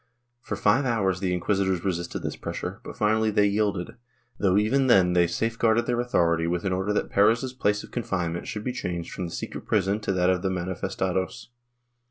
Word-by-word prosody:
For 105 - -4
five 105 +7 +3
hours 100 -8 +1
the 95 -1 -1
inquisitors 95 0 0
resisted 85 -2 -2
this - - -3
pressure, - - -5
but - - -9
finally 110 +1 +2
they 105 -1 +3
yielded, 100 +1 -1 0.4
though 95 -1 +3
even 130 +6 +2
then 95 -7 +5
they 90 -1 +4
safeguarded 115 +4 +1
their 120 -1 0
authority 85 -9 +1
with 85 +2 -2
an 95 - +1
order 95 +3 -1
that 105 - -1
Perez's 115 +6 +3
place 105 -4 0
of - - -13
confinement 90 -8 -2
should 105 - -5
be 125 - -2
changed 90 -8 -4
from 90 - -4
the - - -9
secret - - -6
prison 100 -1 +1
to 105 - -2
that 90 -1 +2
of 90 -1 0
the 95 - 0
manifestados. 95 +2 -3
100 Hz, 195 wpm, -26 LUFS, 90-110 Hz, 0.4 s, then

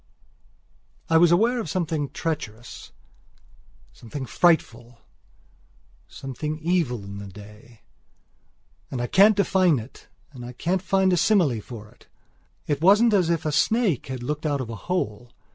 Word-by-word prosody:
I 165 - +6
was 170 0 +5
aware 230 +8 +3
of 195 - -4
something 160 -5 -2
treacherous, 120 -7 -6 1.0
something 130 +4 -8
frightful, 120 - +1 1.1
something 150 +3 -6
evil 160 - -1
in 100 0 -8
the 100 - -8
day. 105 +3 -14 1.1
I 120 -2 -2
can't 200 - +5
define 185 -5 +3
it 115 +2 -10 0.2
and 125 -2 -10
can't 185 +2 -1
find 190 0 +2
a - - +2
simile 165 - +2
for 110 -1 -10
it. - - -23 0.6
It 145 -1 -2
wasn't 210 +6 +5
as 185 -5 +3
if 165 -2 -1
a 155 - 0
snake 205 - +1
had 130 -2 -6
looked 150 +4 -3
out 145 -2 -1
of 120 -3 -5
a - - -5
hole. 120 - -3
150 Hz, 140 wpm, -24 LUFS, 120-180 Hz, 1.1 s, I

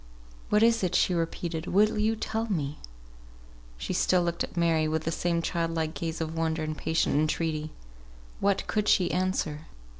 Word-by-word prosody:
"What 210 +1 +4
is 230 -2 +4
it?" 180 - 0
she 185 - +3
repeated. 165 0 -2
"Will 210 +3 +3
you 220 +1 +2
tell 220 +1 -2
me?" 150 -6 -2 1.0
She 60 - -3
still 180 -1 +3
looked 170 0 -1
at - - -8
Mary, 165 -2 +2
with 160 0 -1
the 165 - -1
same 170 0 0
child 165 -1 -1
like 160 -1 -1
gaze 165 -1 -4
of 160 0 -3
wonder 160 -1 -1
and 155 0 -3
patient 160 +1 0
entreaty. 155 +1 0 0.7
What 200 -1 +1
could 210 -1 -1
she 180 -3 +4
answer? 175 -4 -1
165 Hz, 175 wpm, -28 LUFS, 160-185 Hz, 1.0 s, What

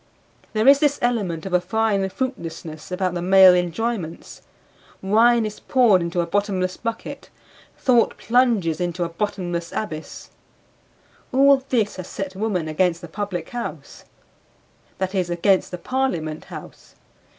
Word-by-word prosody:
There 215 +2 +1
is 280 0 +8
this 290 -1 +2
element 200 -10 -1
of 190 - -5
a 180 - +4
fine 200 0 0
fruitlessness 170 - -6
about 180 -1 -1
the 175 - -3
male 190 0 +7
enjoyments; 180 0 -3 0.6
wine 225 +4 +3
is 210 -1 -6
poured 235 -8 +3
into 170 +1 -1
a - - -1
bottomless 185 0 -1
bucket; 230 -1 -6 0.5
thought 245 -3 +2
plunges 225 -9 +1
into 175 0 -1
a 170 - -3
bottomless 175 -2 -3
abyss. 160 -8 -6 1.0
All 275 0 +5
this 220 -6 0
has 185 -1 -7
set 195 -1 -6
woman 190 -5 -1
against 170 +2 0
the 175 - -8
Public 195 0 -5
House 240 -1 -7 0.9
that 190 0 -2
is, 185 -3 0
against 185 +2 +2
the 180 - -6
Parliament 175 -9 -2
House. - - -11
190 Hz, 140 wpm, -22 LUFS, 175-225 Hz, 1.0 s, is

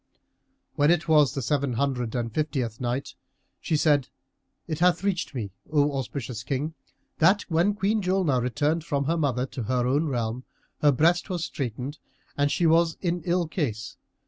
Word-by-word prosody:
When 145 +1 +4
it 170 -1 +2
was 150 -4 +4
the 135 - -2
Seven 140 +1 0
Hundred 125 -2 -1
and 115 -2 -2
Fiftieth 130 -7 -2
Night, 125 +3 -2 0.5
She 155 - 0
said, 145 -4 +3 0.6
It 155 -3 -3
hath 180 +1 +3
reached 185 -7 -1
me, 105 -6 -4 0.2
O 145 -1 +3
auspicious 130 -3 -4
King, 140 +6 -2 0.5
that 190 +6 +4
when 175 +5 +2
Queen 210 +1 +1
Julnar 180 -9 +1
returned 145 +6 0
from 140 -4 -1
her 165 +4 +1
mother 135 -6 0
to 130 - -7
her 125 +2 0
own 145 +6 +1
realm, 120 -2 -2 0.4
her 150 - +6
breast 170 - +2
was 175 -3 -2
straitened 130 +2 -5 0.4
and 145 0 +1
she 175 - +1
was 165 0 +3
in 175 -1 -1
ill 175 -1 +1
case. 125 - -3
145 Hz, 170 wpm, -26 LUFS, 125-170 Hz, 0.6 s, her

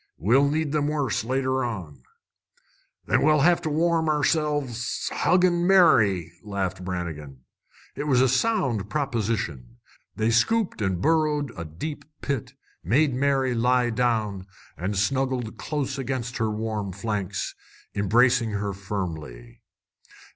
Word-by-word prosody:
"We'll 130 - +3
need 155 0 -1
'em 145 -1 +1
worse 145 -8 -1
later 130 +2 0
on." 90 - -5 1.0
"Then - - +2
we'll 150 -1 +4
have 175 +3 +4
to 160 - -2
warm 160 +1 +1
ourselves 145 -5 0
huggin' 175 -1 +3
Mary," 105 - +4
laughed 100 -3 -3
Brannigan. 80 -7 -5 0.5
It 145 - -4
was 130 -4 +3
a 130 - +5
sound 130 - 0
proposition. 110 - -2 0.4
They 110 +1 +1
scooped 210 - +1
and 95 -2 -1
burrowed 150 -4 +1
a 85 -3 -6
deep 90 - -6 0.2
pit, 140 -6 -3 0.3
made 135 - +2
Mary 135 -1 +1
lie 125 +1 +2
down, 110 -5 -1 0.3
and 95 +3 -3
snuggled 130 +1 -1
close 140 -3 -3
against 125 -2 -3
her 110 -2 0
warm 105 -2 -3
flanks, 100 -1 -3 0.4
embracing 115 +3 +3
her 100 0 -2
firmly. 80 -12 -6
120 Hz, 125 wpm, -25 LUFS, 100-145 Hz, 1.0 s, a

